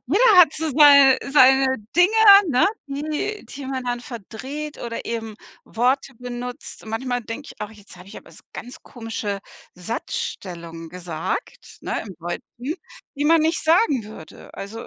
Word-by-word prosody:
Jeder 415 - +4
hat 345 -5 +7
so 320 +1 -3
sei 280 -2 +7
seine 265 -1 +5 0.2
Dinge, 355 +3 +5 0.4
ne, 255 -2 +3 0.2
die 305 +9 -4
die 275 -1 -8
man 260 -1 -4
dann 245 -1 -2
verdreht 260 +6 -8
oder 230 -1 -6
eben 225 -2 -4 0.3
Worte 260 +4 -1
benutzt. 245 0 -8
Manchmal 245 +3 -3
denke 230 +6 -7
ich - - -16
auch: 210 - -5
„Jetzt 210 -2 -16
habe 180 +2 -14
ich - - -11
aber - - -18
's - - -17
ganz 245 - -9
komische 225 -4 -5 0.4
Satzstellungen 170 -3 -6
gesagt“, 180 - -6
ne, - - -3
im 190 - -9
Deutschen, 235 - -6 0.4
die 290 - -2
man 330 +1 +5
nicht 320 +1 0
sagen 315 - +2
würde, 205 -7 -13
also 220 +3 -8
250 Hz, 155 wpm, -22 LUFS, 220-290 Hz, 0.4 s, hat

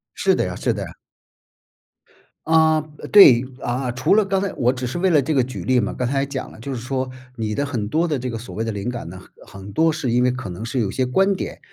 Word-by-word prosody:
是 - - +2
的 - - 0
呀 - - -4
是 - - 0
的 - - -5
呀。 - - -7 1.6
啊， 160 -1 +4 0.3
对， 135 - +8 0.2
啊， 125 +1 -2
除 130 +10 +2
了 215 -1 +4
刚 195 0 0
才 200 - -2
我 125 0 +2
只 125 -1 -4
是 130 - -4
为 185 +2 +2
了 155 -5 +4
这 155 +4 -1
个 130 -4 +3
举 130 - -6
例 130 -1 +3
嘛， 105 - -1
刚 125 - -2
才 135 +2 0
也 - - 0
讲 140 -1 -5
了， - - -14
就 135 +4 -5
是 120 - -4
说 130 0 -3 0.3
你 110 -2 -3
的 140 +5 -1
很 120 -7 -3
多 165 +8 +1
的 150 -4 -1
这 125 0 -4
个 115 - -4
所 115 - -9
谓 110 - -2
的 115 - -2
灵 100 +2 -4
感 120 -6 -5
呢， 95 +2 -9 0.3
很 95 - -12
很 100 - -9
多 160 +6 +3
是 155 -5 -3
因 125 +1 +3
为 125 - +3
可 125 -6 -6
能 90 +5 -7
是 125 +2 -2
有 105 - 0
些 130 +6 -1
观 195 +10 +2
点， - - -6
130 Hz, 290 characters per minute, -21 LUFS, 120-155 Hz, 1.6 s, 对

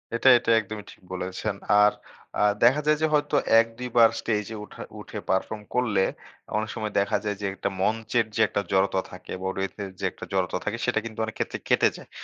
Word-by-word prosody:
এটা, 115 - +1
এটা 115 - 0
একদমই 110 0 -6
ঠিক - - -18
বলেছেন। 95 +3 -3 0.3
আর 105 0 +6 0.5
আ - - +2 0.2
দেখা 130 +6 +5
যায় 155 0 +4
যে - - +4
হয়তো, 150 0 +2 0.2
১, 115 - +3
২ 125 0 -4
বার 115 -1 +8
স্টেজে 110 0 -2
উঠার 105 - -9
উঠে - - -8
পারফর্ম 105 +3 0
করলে, 110 -6 +2 0.5
অনেক 110 +1 -2
সময় 110 -2 -3
দেখা 100 - +1
যায় 105 -1 -1
যে, - - -2
একটা 100 - -2
মঞ্চের 115 +3 +1
যে - - +2
একটা 100 - -1
জড়তা 95 0 +2
থাকে। 90 0 -11
বা 95 - -2
রেথের 95 +1 -4
যে 100 - -2
একটা - - -9
জড়তা 90 -2 0
থাকে, 105 +2 -1
সেটা 120 -3 +2
কিন্তু 110 -1 -7
অনেক 110 - -7
ক্ষেত্রে - - -2
কেটে - - +4
যায়। - - -13
110 Hz, 205 wpm, -26 LUFS, 95-115 Hz, 0.5 s, বার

